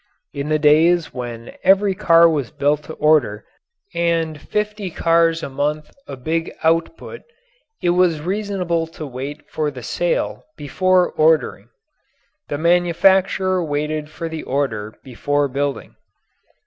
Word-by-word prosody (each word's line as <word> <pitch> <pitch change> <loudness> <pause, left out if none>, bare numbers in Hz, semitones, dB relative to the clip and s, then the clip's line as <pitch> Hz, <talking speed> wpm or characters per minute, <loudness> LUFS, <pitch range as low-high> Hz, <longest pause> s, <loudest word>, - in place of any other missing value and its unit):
In 140 +1 -4
the 155 - +2
days 160 +3 +3
when 120 -2 -7
every 195 +1 +4
car 170 -2 +5
was 145 -7 -1
built 145 +1 0
to 160 - -8
order 145 -10 +2 0.5
and 165 -3 -1
50 210 0 -3
cars 165 0 +2
a - - -3
month 150 +2 -3 0.2
a 135 - -7
big 165 +6 -2
output, 165 - -1 0.6
it 175 - +3
was 175 -3 +2
reasonable 180 -2 -2
to 160 -1 -9
wait 140 +3 -7
for 155 -1 -2
the - - -10
sale - - -2
before 185 +5 +1
ordering. 155 -9 +1 0.8
The 145 - -3
manufacturer 180 +2 +2
waited 150 0 -3
for 165 +2 -6
the 160 -1 -5
order 110 -6 -3
before 145 +3 -1
building. 140 +1 -3
160 Hz, 130 wpm, -20 LUFS, 145-175 Hz, 0.8 s, car